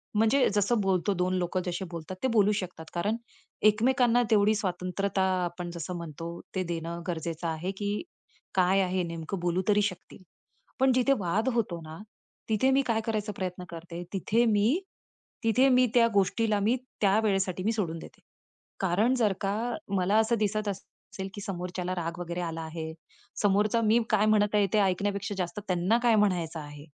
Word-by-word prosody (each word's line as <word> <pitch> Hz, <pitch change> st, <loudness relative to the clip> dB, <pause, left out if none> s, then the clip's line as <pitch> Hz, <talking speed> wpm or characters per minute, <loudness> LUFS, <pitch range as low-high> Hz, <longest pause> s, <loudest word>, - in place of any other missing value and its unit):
म्हणजे 225 Hz, +6 st, +4 dB
जसं 210 Hz, +3 st, +2 dB
बोलतो 190 Hz, -1 st, +1 dB
2 180 Hz, 0 st, 0 dB
लोक 180 Hz, +1 st, -2 dB
जसे 180 Hz, +1 st, -3 dB
बोलतात 170 Hz, +2 st, -6 dB
ते -, -, +3 dB
बोलू 210 Hz, -4 st, +4 dB
शकतात. 180 Hz, -5 st, -4 dB
कारण 205 Hz, +6 st, 0 dB, 0.5 s
एकमेकांना 245 Hz, +2 st, +3 dB
तेवढी 215 Hz, 0 st, +4 dB
स्वातंत्रता 190 Hz, 0 st, -1 dB, 0.2 s
आपण 175 Hz, 0 st, -4 dB
जसं 170 Hz, +1 st, -5 dB
म्हणतो, 170 Hz, +1 st, -7 dB, 0.2 s
ते 185 Hz, -, 0 dB
देणं 170 Hz, 0 st, -4 dB
गरजेचं 170 Hz, -1 st, -3 dB
आहे, 165 Hz, +3 st, -2 dB
की 205 Hz, +1 st, -2 dB, 0.5 s
काय 190 Hz, +1 st, +4 dB
आहे 185 Hz, -1 st, 0 dB
नेमकं 170 Hz, +2 st, -5 dB
बोलू 175 Hz, +1 st, 0 dB
तरी 210 Hz, -1 st, +4 dB
शकतील. 190 Hz, -1 st, -4 dB, 0.6 s
पण 265 Hz, 0 st, +5 dB
जिथे 255 Hz, +2 st, +3 dB
वाद 200 Hz, +7 st, 0 dB
होतो 200 Hz, -7 st, -1 dB
ना, 160 Hz, 0 st, -9 dB, 0.5 s
तिथे 220 Hz, +5 st, +3 dB
मी 270 Hz, +1 st, +4 dB
काय 225 Hz, -2 st, +1 dB
करायचा 215 Hz, -2 st, -1 dB
प्रयत्न 180 Hz, -1 st, -4 dB
करते 170 Hz, +1 st, -7 dB
तिथे 210 Hz, +5 st, +2 dB
मी, 220 Hz, -, +3 dB, 0.6 s
तिथे 230 Hz, +4 st, +4 dB
मी 255 Hz, 0 st, +5 dB
त्या 235 Hz, -2 st, +6 dB
गोष्टीला 210 Hz, +2 st, +2 dB
मी 215 Hz, +5 st, +2 dB, 0.3 s
त्या 200 Hz, 0 st, +4 dB
वेळेसाठी 190 Hz, -3 st, 0 dB
मी 220 Hz, -, +2 dB
सोडून 175 Hz, -7 st, -2 dB
देते. -, -, -12 dB, 0.6 s
कारण 195 Hz, +6 st, +2 dB
जर 220 Hz, -5 st, +2 dB
का 195 Hz, 0 st, 0 dB, 0.4 s
मला 190 Hz, +3 st, +2 dB
असं 220 Hz, +2 st, +2 dB
दिसत 215 Hz, 0 st, 0 dB
असेल, 190 Hz, 0 st, -8 dB
की 205 Hz, -, -7 dB
समोरच्याला 180 Hz, -1 st, -4 dB
राग 170 Hz, -1 st, -4 dB
वगैरे 175 Hz, 0 st, -4 dB
आला 165 Hz, -1 st, -4 dB
आहे, 160 Hz, 0 st, -6 dB, 0.5 s
समोरचा 210 Hz, +3 st, +3 dB
मी 220 Hz, +2 st, +5 dB
काय 215 Hz, -1 st, +3 dB
म्हणत 210 Hz, -1 st, +3 dB
आहे 205 Hz, -1 st, +4 dB
ते 215 Hz, -, +4 dB
ऐकण्यापेक्षा 200 Hz, +1 st, 0 dB
जास्त 180 Hz, +1 st, -3 dB
त्यांना 185 Hz, +5 st, +2 dB
काय 235 Hz, -2 st, +5 dB
म्हणायचं 180 Hz, -6 st, +1 dB
आहे. 145 Hz, -1 st, -10 dB
195 Hz, 170 wpm, -28 LUFS, 175-215 Hz, 0.6 s, त्या